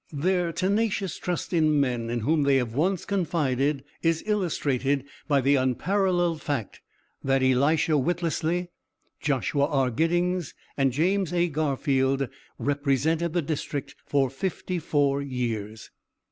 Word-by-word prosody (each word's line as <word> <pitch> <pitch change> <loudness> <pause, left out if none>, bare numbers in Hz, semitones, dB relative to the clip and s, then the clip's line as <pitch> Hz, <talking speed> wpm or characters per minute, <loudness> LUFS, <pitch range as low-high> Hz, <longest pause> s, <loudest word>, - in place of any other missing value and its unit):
Their 175 +3 0
tenacious 195 +1 0
trust 180 +1 -3
in 155 -3 +3
men 120 -4 0
in 120 0 -1
whom 150 +7 +2
they 140 -1 +3
have 125 -4 0
once 180 +7 0
confided 150 -7 0 0.2
is 165 -1 +1
illustrated 145 - 0 0.2
by 140 -3 +3
the 140 +2 +3
unparalleled 175 - +1
fact 135 -9 -3 0.4
that 135 0 +2
Elisha 145 +5 +3
Whittlesey, 170 +2 -1 0.5
Joshua 140 0 +1
R. 135 -4 +1
Giddings, 175 +4 0 0.2
and 135 -2 +2
James 180 +6 +1
A. 175 0 +2
Garfield 135 -3 0 0.3
represented 145 +4 0
the 175 -2 +1
district 145 -1 -4
for 135 -3 +1
fifty 180 +4 -3
four 140 -2 +1
years. 115 -6 -4
145 Hz, 125 wpm, -26 LUFS, 135-175 Hz, 0.5 s, in